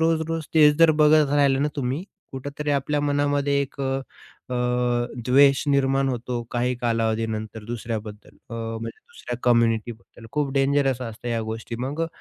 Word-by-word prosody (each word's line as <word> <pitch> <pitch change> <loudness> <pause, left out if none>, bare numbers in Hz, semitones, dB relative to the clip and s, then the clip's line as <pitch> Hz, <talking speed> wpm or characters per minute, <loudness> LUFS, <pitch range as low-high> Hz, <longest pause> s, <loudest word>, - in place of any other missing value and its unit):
रोज, 160 0 +2
रोज, 165 -1 -2
तेच 150 -2 +6
जर 165 -1 +7
बघत 150 -1 +5
राहिले 140 -2 +3
ना 145 +2 +1
तुम्ही, 135 +3 -2 0.3
कुठेतरी 145 +3 -4
आपल्या 145 +1 0
मनामध्ये 145 -1 +1
एक 140 0 -8
अ, 135 0 0 0.5
अ, - - -2 0.7
द्वेष 135 +1 +5
निर्माण 135 -1 +2
होतो 120 -1 -3
काही 125 +1 0
कालावधीनंतर 110 -2 -2
दुसऱ्याबद्दल. 110 -2 -6
अ, - - -5
म्हणजे 115 0 -5
दुसऱ्या 120 -1 -8
कम्युनिटीबद्दल. 115 -1 0
खूप 145 -2 -1
डेंजरस 135 -2 +2
असतं 115 0 -6
ह्या 115 -1 -1
गोष्टी 115 +1 -5
मग 145 +4 -4
अ, 165 - 0
135 Hz, 150 wpm, -24 LUFS, 115-145 Hz, 0.7 s, जर